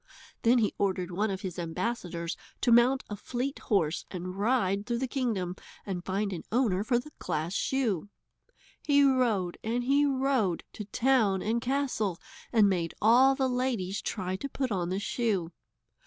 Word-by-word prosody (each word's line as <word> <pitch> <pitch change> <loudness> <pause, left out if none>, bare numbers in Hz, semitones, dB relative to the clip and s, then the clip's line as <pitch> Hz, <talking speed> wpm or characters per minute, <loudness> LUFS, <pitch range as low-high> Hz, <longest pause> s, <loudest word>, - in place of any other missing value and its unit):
Then 235 +2 +4
he 220 -3 +2
ordered 185 -2 0
one 205 +5 0
of 190 -1 -3
his 185 -2 -5
ambassadors 170 -1 -3 0.3
to 245 - +3
mount 245 +3 +5
a 205 - -5
fleet 250 +6 -4
horse 170 -7 0
and 185 0 -5
ride 200 -2 +1
through 240 -1 0
the 260 +2 -1
kingdom 220 -9 -1 0.3
and 185 -3 -4
find 195 +2 -1
an 170 - -4
owner 215 -5 +2
for 240 +2 +2
the 300 +5 -5
glass 165 0 -2
shoe. 215 -7 0 0.7
He 285 -1 +4
rode 235 -10 +2
and 235 +2 -1
he 280 +3 +3
rode 260 -10 +1
to 210 - -6
town 220 -4 +2
and 230 +2 0
castle, 250 -8 -1 0.3
and 220 -4 +5
made 175 -4 -1
all 255 +5 +6
the 265 -1 +1
ladies 240 -7 -1
try 185 -3 -3
to 280 - -5
put 265 -2 -2
on 180 -3 -1
the 185 - -1
shoe. 200 -5 -1
215 Hz, 170 wpm, -29 LUFS, 185-250 Hz, 0.7 s, all